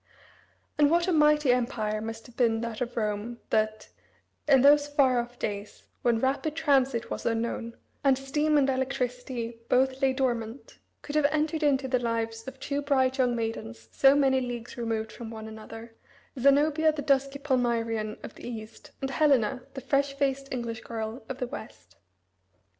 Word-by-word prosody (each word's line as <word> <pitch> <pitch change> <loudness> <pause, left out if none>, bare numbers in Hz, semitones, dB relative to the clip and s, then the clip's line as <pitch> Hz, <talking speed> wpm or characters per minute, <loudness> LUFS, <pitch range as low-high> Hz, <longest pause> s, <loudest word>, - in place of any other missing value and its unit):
And 290 -1 +6
what 340 +2 +2
a - - +2
mighty 300 -3 +4
empire 220 -3 0
must 225 0 -6
have 245 - -15
been 225 -3 +2
that 230 -1 -5
of 240 -1 -3
Rome 215 +2 -2
that, 215 0 0 0.6
in 270 -3 +6
those 290 +1 +6
far 270 -4 +3
off 240 +1 -5
days, 205 -2 -5 0.2
when 235 -2 +2
rapid 275 +5 0
transit 270 -6 +1
was - - -4
unknown, 230 0 -2 0.3
and 270 -2 +4
steam 295 +3 +1
and 275 -2 +4
electricity 250 -3 -2
both 260 +1 +2
lay 270 -1 +4
dormant, 240 -2 -3 0.2
could 290 - -7
have 305 -1 +3
entered 310 +1 0
into 275 -3 +2
the 255 -1 +1
lives 225 -1 -2
of 265 0 -8
two 285 +1 -2
bright 265 -2 +1
young 250 -2 +3
maidens 115 - -5
so 270 0 +5
many 265 -2 +3
leagues 245 -1 -5
removed 225 -2 -2
from 235 -2 -8
one 220 -1 -8
another 225 +1 -10 0.5
Zenobia, 295 +4 +4
the 300 -2 -5
dusky 275 -1 +1
Palmyrean 230 -5 -1
of - - -8
the - - -10
East, 225 -2 -8
and 270 0 -2
Helena, 265 -4 +2
the 265 - -5
fresh 275 +1 0
faced 275 -1 -1
English 230 -3 -4
girl 225 +1 -5
of 265 - -4
the 255 - -2
West. 100 - -10
250 Hz, 170 wpm, -28 LUFS, 230-275 Hz, 0.6 s, And